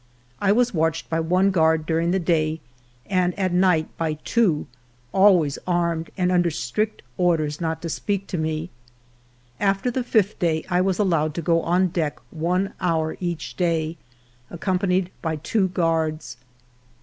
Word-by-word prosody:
I 200 -1 +3
was 245 +2 +2
watched 160 0 -1
by 165 - +1
one 180 +4 +2
guard 160 -3 +2
during 165 +1 0
the 185 - +2
day 160 -3 0 0.5
and 180 -1 0
at 185 -3 0
night 180 -3 +3
by 160 -2 0
two, 200 -11 +2 0.5
always 185 -7 +4
armed 170 -2 0
and 180 -1 +1
under 175 -1 +3
strict 155 - -2 0.2
orders 160 -4 +1
not 160 0 -2
to - - -2
speak 200 +4 -2
to 180 - -2
me. 155 +2 -2 0.9
After 195 +5 +1
the 255 +1 -1
fifth 215 -4 +1
day 160 -3 0
I 180 0 +3
was 190 -1 +1
allowed 165 -7 +1
to 170 - -3
go 165 +1 +2
on 180 +3 +2
deck 165 -4 -2
one 180 +4 -1
hour 160 -3 0
each 175 -3 -4
day, 165 -2 0 0.5
accompanied 185 +1 0
by 160 -2 -1
two 190 +6 0
guards. 160 -7 -1
170 Hz, 155 wpm, -23 LUFS, 160-185 Hz, 0.9 s, always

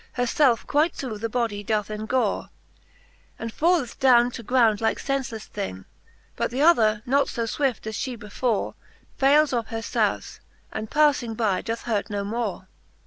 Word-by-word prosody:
Her 245 - 0
felfe 245 -2 +2
quite 300 +3 +2
through 230 -6 -5
the 230 +1 -2
bodie 225 -3 -1
doth 210 0 -1
engore, 220 +4 -1 0.9
And 230 -1 -6
falleth 325 -7 +1
downe 245 -2 +5
to 235 - -7
ground 230 -3 +3
like 225 - +1
fenfeleffe 265 -6 -3
thing; 95 - -6 0.5
But - - -1
th' 240 - -9
other 230 -8 +4
not 280 +3 +2
fo 235 - -2
fwift, 250 0 -1
as 220 -1 -4
fhe 255 -3 -3
before, 225 +1 -2 0.5
Fayles 285 +2 +4
of 235 -2 -1
her 225 -1 -5
foufe, - - -1 0.3
and 215 - -5
pafUng 285 -7 +2
by 210 -5 +1
doth 230 0 -4
hurt 215 -3 -1
no 205 -1 -2
more. 210 -3 -3
235 Hz, 165 wpm, -25 LUFS, 215-265 Hz, 0.9 s, downe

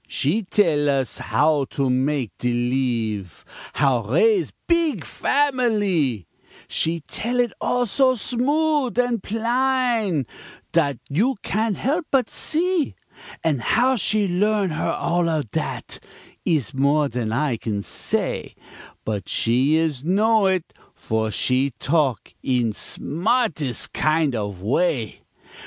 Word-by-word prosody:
She 165 +12 0
tell 165 -7 +2
us 135 -3 -1
how 150 -2 +2
to 135 0 -2
mak' 130 -1 0
de 125 - 0
leeve, 120 - -2 0.3
How 135 -5 +2
raise 170 - +2 0.2
beeg 335 -3 +1
familee; 210 - +1 0.4
She 165 +1 -1
tell 240 +10 -3
it 240 -3 +1
all 245 0 +1
so 255 +3 +3
smood 275 +3 0
an' 245 -2 +2
plain 230 - 0 0.5
Dat 145 -4 +2
you 220 - +1
can't 215 -1 -1
help 305 +5 -1
but 260 -4 +1
see; 335 -1 0 0.5
An' 155 -5 +1
how 250 - +2
she 210 -2 +1
learn 200 +1 +1
her 155 - -1
all 170 0 0
of 150 -9 -2
dat - - -4 0.5
Ees 150 -10 0
more 140 +2 +2
dan 120 -4 -3
I 130 0 0
can 105 -3 -3
say, - - -2 0.5
But 105 -4 -3
she 130 +6 +2
is 160 -5 0
know 210 +4 +3
it, 185 -3 -1 0.2
for 110 0 -1
she 130 +4 0
talk 135 - 0
In 120 -4 0
smartes' 170 - -1
kind 155 -2 +1
of 100 -5 -4
way. 125 - 0
160 Hz, 125 wpm, -22 LUFS, -, 0.5 s, so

